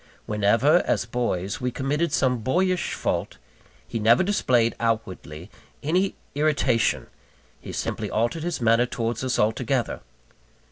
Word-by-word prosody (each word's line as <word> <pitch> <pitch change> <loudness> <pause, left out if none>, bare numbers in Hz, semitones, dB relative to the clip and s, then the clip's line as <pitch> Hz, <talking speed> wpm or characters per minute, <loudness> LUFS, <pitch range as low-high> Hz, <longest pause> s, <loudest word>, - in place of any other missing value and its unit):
Whenever, 110 +9 +3
as - - +1
boys, 115 -5 -2
we 125 - 0
committed 145 +5 -1
some 125 -4 +1
boyish 180 - 0
fault, - - -2 0.5
he 115 - -3
never 115 +8 +5
displayed 125 - +2
outwardly 100 -7 -3 0.3
any 180 +6 +1 0.2
irritation 140 -5 +1 0.5
he - - -8
simply - - -3
altered 120 +9 0
his 170 +1 -2
manner 115 +1 +3
towards 115 0 -3
us 130 -1 0
altogether. 120 +4 0
125 Hz, 125 wpm, -24 LUFS, 115-145 Hz, 0.5 s, never